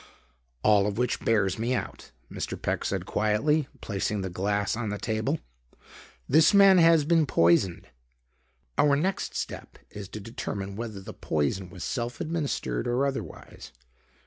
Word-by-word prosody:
"All 105 Hz, -2 st, +4 dB
of 105 Hz, -, -3 dB
which 125 Hz, 0 st, 0 dB
bears 105 Hz, -3 st, +1 dB
me 120 Hz, +3 st, 0 dB
out," -, -, -6 dB, 0.2 s
Mr. -, -, -5 dB
Peck -, -, -2 dB
said -, -, -2 dB
quietly, 130 Hz, +8 st, +1 dB
placing 100 Hz, 0 st, -2 dB
the 95 Hz, -1 st, -4 dB
glass 100 Hz, +3 st, -1 dB
on 115 Hz, -2 st, -3 dB
the 105 Hz, -, -3 dB
table. 110 Hz, +1 st, -1 dB, 0.9 s
"This 160 Hz, +8 st, +5 dB
man 195 Hz, -2 st, +7 dB
has 165 Hz, -3 st, +5 dB
been 165 Hz, -1 st, +3 dB
poisoned. 85 Hz, -2 st, +2 dB, 0.9 s
Our 145 Hz, -1 st, +5 dB
next 185 Hz, +7 st, -2 dB
step -, -, -6 dB
is 100 Hz, -2 st, -8 dB
to 110 Hz, -, -7 dB
determine 100 Hz, -3 st, -5 dB
whether 110 Hz, -3 st, -6 dB
the -, -, -9 dB
poison 80 Hz, +5 st, -2 dB
was -, -, -9 dB
self 120 Hz, -2 st, -3 dB
administered 155 Hz, -5 st, -2 dB
or 125 Hz, +3 st, +1 dB
otherwise. 135 Hz, -, -6 dB
110 Hz, 145 wpm, -27 LUFS, 100-140 Hz, 0.9 s, man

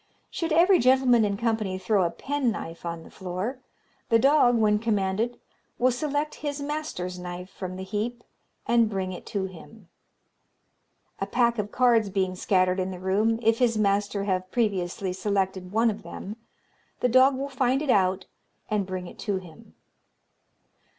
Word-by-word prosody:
"Should 330 Hz, -1 st, -3 dB
every 350 Hz, +4 st, +5 dB
gentleman 255 Hz, -2 st, +4 dB
in 200 Hz, -1 st, 0 dB
company 220 Hz, -4 st, -1 dB
throw 190 Hz, +2 st, +1 dB
a 170 Hz, -, +1 dB
penknife 230 Hz, -, -3 dB
on 170 Hz, -1 st, -5 dB
the -, -, -15 dB
floor, 190 Hz, +8 st, -4 dB, 0.5 s
the 230 Hz, -, +5 dB
dog, 260 Hz, -1 st, +4 dB
when 210 Hz, -2 st, +3 dB
commanded, 215 Hz, +1 st, -1 dB, 0.4 s
will 255 Hz, +1 st, +3 dB
select 290 Hz, +4 st, -2 dB
his 290 Hz, -1 st, -3 dB
master's 285 Hz, -, -4 dB
knife 180 Hz, +1 st, -7 dB
from 185 Hz, -1 st, -6 dB
the 190 Hz, -, -6 dB
heap, 220 Hz, +5 st, -3 dB, 0.4 s
and 235 Hz, -2 st, +3 dB
bring 190 Hz, -2 st, -3 dB
it 180 Hz, -, -10 dB
to 200 Hz, -2 st, -2 dB
him. 190 Hz, +2 st, -12 dB, 1.3 s
"A 195 Hz, -, -2 dB
pack 235 Hz, +1 st, +2 dB
of 210 Hz, 0 st, -3 dB
cards 235 Hz, -4 st, +3 dB
being 190 Hz, -1 st, 0 dB
scattered 185 Hz, 0 st, +1 dB
in 185 Hz, 0 st, -1 dB
the 185 Hz, -, -6 dB
room, 205 Hz, +5 st, +1 dB
if 225 Hz, +1 st, +3 dB
his 235 Hz, -3 st, +2 dB
master 200 Hz, -1 st, +1 dB
have 185 Hz, -2 st, -1 dB
previously 190 Hz, -4 st, -1 dB
selected 190 Hz, -1 st, -1 dB
one 225 Hz, +2 st, +3 dB
of 210 Hz, +1 st, -8 dB
them, 205 Hz, +3 st, -8 dB, 0.7 s
the -, -, +3 dB
dog 260 Hz, +3 st, +5 dB
will 275 Hz, +1 st, -3 dB
find 265 Hz, +1 st, 0 dB
it 285 Hz, -, +2 dB
out 185 Hz, -2 st, +2 dB, 0.5 s
and 205 Hz, -3 st, 0 dB
bring 185 Hz, -1 st, -4 dB
it -, -, -12 dB
to 200 Hz, -2 st, -1 dB
him. 175 Hz, -4 st, -13 dB
210 Hz, 165 wpm, -26 LUFS, 185-245 Hz, 1.3 s, every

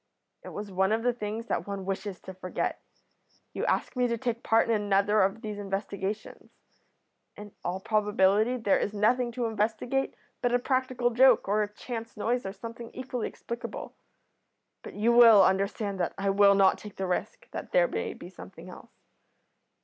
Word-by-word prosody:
It -, -, -8 dB
was 205 Hz, -1 st, -7 dB
one 190 Hz, +2 st, +1 dB
of 225 Hz, +1 st, +1 dB
the 245 Hz, 0 st, +2 dB
things 220 Hz, 0 st, -5 dB
that -, -, -2 dB
one 200 Hz, -1 st, -5 dB
wishes 195 Hz, 0 st, -4 dB
to 190 Hz, -, -9 dB
forget. 185 Hz, 0 st, -3 dB, 0.7 s
You -, -, -2 dB
ask -, -, 0 dB
me 250 Hz, -1 st, +2 dB
to 235 Hz, -1 st, -1 dB
take 235 Hz, -1 st, -3 dB
part 225 Hz, +1 st, +3 dB
in 230 Hz, -, +2 dB
another 205 Hz, 0 st, +2 dB
of 195 Hz, +4 st, +1 dB
these 210 Hz, -1 st, -5 dB
investigations. 200 Hz, +1 st, -4 dB, 0.9 s
In 210 Hz, 0 st, -10 dB
all 180 Hz, +2 st, -2 dB
probability 210 Hz, +2 st, +2 dB
there 215 Hz, -5 st, +2 dB
is 210 Hz, -, -2 dB
nothing 240 Hz, +4 st, +2 dB
to 245 Hz, -1 st, -2 dB
investigate 225 Hz, +5 st, -1 dB, 0.3 s
but 245 Hz, -1 st, +2 dB
a -, -, +6 dB
practical 255 Hz, -1 st, 0 dB
joke, 250 Hz, -1 st, +5 dB
or 210 Hz, +2 st, +2 dB
a 205 Hz, -1 st, -2 dB
chance 230 Hz, +1 st, -7 dB
noise, 235 Hz, +1 st, -1 dB
or -, -, -4 dB
something 230 Hz, +3 st, -9 dB
equally 255 Hz, -2 st, -3 dB
explicable, 235 Hz, +1 st, -7 dB, 0.9 s
but -, -, -10 dB
you 220 Hz, +3 st, +2 dB
will 230 Hz, -4 st, +8 dB
understand 195 Hz, +1 st, 0 dB
that 175 Hz, -, -1 dB
I 195 Hz, 0 st, 0 dB
will 200 Hz, 0 st, +5 dB
not 195 Hz, -1 st, +4 dB
take 210 Hz, -2 st, -10 dB
the 190 Hz, -, -3 dB
risk 180 Hz, -1 st, -3 dB
that -, -, -7 dB
there -, -, +4 dB
may -, -, -4 dB
be -, -, -10 dB
something -, -, -11 dB
else." -, -, -13 dB
215 Hz, 180 wpm, -28 LUFS, 200-235 Hz, 0.9 s, will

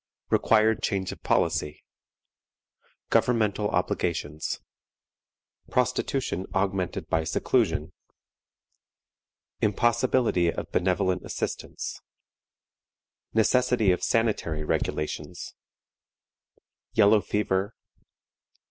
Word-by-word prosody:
Required 110 Hz, 0 st, +3 dB
Change 95 Hz, -2 st, -1 dB
of -, -, -10 dB
Policy. 75 Hz, 0 st, 0 dB, 1.3 s
Governmental 105 Hz, -3 st, +2 dB
Obligations. 75 Hz, -3 st, -1 dB, 1.1 s
Prostitution 125 Hz, -5 st, 0 dB
augmented 95 Hz, -2 st, -1 dB
by 80 Hz, 0 st, +1 dB
Seclusion. 80 Hz, +1 st, 0 dB, 1.7 s
Impossibility 115 Hz, -4 st, +2 dB
of -, -, -6 dB
benevolent 95 Hz, 0 st, +1 dB
Assistance. -, -, -5 dB, 1.3 s
Necessity 120 Hz, -2 st, +3 dB
of 90 Hz, -, 0 dB
sanitary 105 Hz, -9 st, 0 dB
Regulations. 75 Hz, 0 st, -3 dB, 1.4 s
Yellow 105 Hz, 0 st, +5 dB
Fever. 100 Hz, +1 st, -1 dB
100 Hz, 65 wpm, -26 LUFS, 90-115 Hz, 1.7 s, Yellow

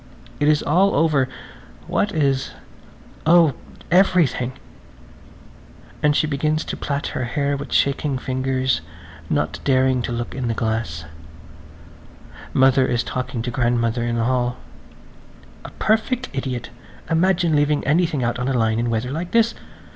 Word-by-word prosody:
It 145 Hz, -, +2 dB
is 150 Hz, -1 st, +3 dB
all 185 Hz, +6 st, +3 dB
over! 150 Hz, -5 st, +2 dB, 0.6 s
What 205 Hz, -, 0 dB
is? 140 Hz, -5 st, 0 dB, 0.7 s
Oh, 165 Hz, -3 st, +6 dB, 0.4 s
everything! 170 Hz, -9 st, +3 dB, 1.5 s
And 150 Hz, -1 st, +3 dB
she -, -, +3 dB
begins 155 Hz, +1 st, -1 dB
to -, -, -4 dB
plait 140 Hz, 0 st, -3 dB
her 130 Hz, -, -2 dB
hair 140 Hz, +3 st, -1 dB
with 140 Hz, +1 st, -7 dB
shaking 140 Hz, 0 st, +1 dB
fingers, 130 Hz, 0 st, -1 dB, 0.5 s
not -, -, -1 dB
daring 130 Hz, -1 st, +2 dB
to 120 Hz, -, -4 dB
look 120 Hz, 0 st, -4 dB
in 130 Hz, -2 st, -3 dB
the 115 Hz, -, -1 dB
glass. 110 Hz, -9 st, -2 dB, 1.5 s
Mother 130 Hz, 0 st, +4 dB
is 120 Hz, 0 st, 0 dB
talking 125 Hz, -2 st, -4 dB
to 120 Hz, -, -3 dB
grandmother 120 Hz, -1 st, 0 dB
in 120 Hz, 0 st, -1 dB
the 115 Hz, -, 0 dB
hall. 125 Hz, 0 st, 0 dB, 1.1 s
"A -, -, -8 dB
perfect 235 Hz, +3 st, 0 dB
idiot! 130 Hz, -3 st, -4 dB, 0.4 s
Imagine 170 Hz, -1 st, +2 dB
leaving 145 Hz, 0 st, +1 dB
anything 155 Hz, -3 st, +1 dB
out 120 Hz, +1 st, -1 dB
on 125 Hz, -, -2 dB
the 135 Hz, -2 st, +1 dB
line 110 Hz, -1 st, +1 dB
in 120 Hz, 0 st, 0 dB
weather 115 Hz, +2 st, -1 dB
like 170 Hz, +4 st, -4 dB
this. 230 Hz, 0 st, +3 dB
135 Hz, 140 wpm, -21 LUFS, 120-155 Hz, 1.5 s, Oh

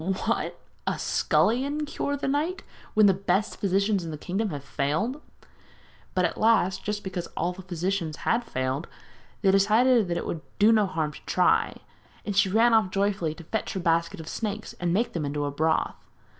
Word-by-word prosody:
'What! 190 Hz, +2 st, -1 dB, 0.3 s
a -, -, 0 dB
scullion 280 Hz, +6 st, +1 dB
cure 285 Hz, -1 st, -2 dB
the 280 Hz, -, -3 dB
knight 310 Hz, +7 st, -1 dB, 0.3 s
when 215 Hz, -1 st, +6 dB
the 195 Hz, -, +6 dB
best 195 Hz, +2 st, 0 dB
physicians 195 Hz, 0 st, +1 dB
in 165 Hz, -, -5 dB
the 155 Hz, -, -5 dB
kingdom 195 Hz, +7 st, -2 dB
have 145 Hz, -5 st, -5 dB
failed?' 160 Hz, -, -1 dB, 0.9 s
But 185 Hz, -1 st, +3 dB
at 165 Hz, -, -2 dB
last, 215 Hz, -4 st, +3 dB
just 210 Hz, 0 st, -3 dB
because 185 Hz, -2 st, -4 dB
all 175 Hz, +2 st, 0 dB
the 190 Hz, -, -10 dB
physicians 180 Hz, -2 st, -2 dB
had 235 Hz, +1 st, +2 dB
failed, 130 Hz, -, -2 dB, 0.6 s
they 195 Hz, -, +5 dB
decided 215 Hz, +3 st, +4 dB
that 170 Hz, 0 st, -1 dB
it -, -, -3 dB
would 165 Hz, -, -4 dB, 0.2 s
do 210 Hz, +2 st, +6 dB
no 215 Hz, -3 st, +4 dB
harm 160 Hz, -5 st, -2 dB
to -, -, -12 dB
try; -, -, +2 dB, 0.5 s
and 205 Hz, -, -3 dB
she 195 Hz, 0 st, +4 dB
ran 230 Hz, +4 st, +4 dB
off 220 Hz, -4 st, +4 dB
joyfully 195 Hz, -5 st, 0 dB
to 170 Hz, -, -11 dB
fetch 220 Hz, +7 st, -3 dB
her 190 Hz, -, -2 dB
basket 170 Hz, +1 st, +1 dB
of 160 Hz, -, -8 dB
snakes 215 Hz, +2 st, -4 dB
and 175 Hz, -1 st, 0 dB
make 220 Hz, +7 st, +1 dB
them 165 Hz, -, -2 dB
into 145 Hz, 0 st, -2 dB
broth. 160 Hz, +3 st, +1 dB
195 Hz, 185 wpm, -26 LUFS, 170-220 Hz, 0.9 s, when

